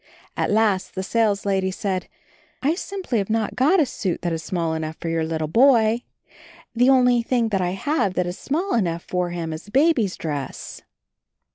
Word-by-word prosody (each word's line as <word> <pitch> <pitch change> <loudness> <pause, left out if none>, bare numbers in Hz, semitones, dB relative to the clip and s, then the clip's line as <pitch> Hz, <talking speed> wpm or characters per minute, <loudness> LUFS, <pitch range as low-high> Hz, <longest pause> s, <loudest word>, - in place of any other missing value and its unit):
At - - 0
last 205 -3 +1
the 190 - -2
saleslady 200 -3 +1
said, 190 -1 -3 0.6
"I 290 +4 +3
simply 370 - -3
have 195 - -3
not 220 -1 -1
got 305 +9 +4
a 310 - +4
suit 190 -9 -3
that 175 -1 0
is 165 - -3
small 165 0 -2
enough 160 0 -4
for 165 - -4
your 165 -1 0
little 160 -1 -2
boy. 230 - +4 0.7
The 245 +2 +4
only 250 -2 +4
thing 235 -1 0
that 195 -3 0
I 180 0 -1
have 200 - -1
that 180 - +1
is 175 0 -4
small 345 +8 -1
enough 170 -6 0
for 180 -1 -2
him 170 -2 -4
is 155 +5 -8
a - - -13
baby's 265 - +2
dress." 145 -4 -5
200 Hz, 185 wpm, -23 LUFS, 175-245 Hz, 0.7 s, got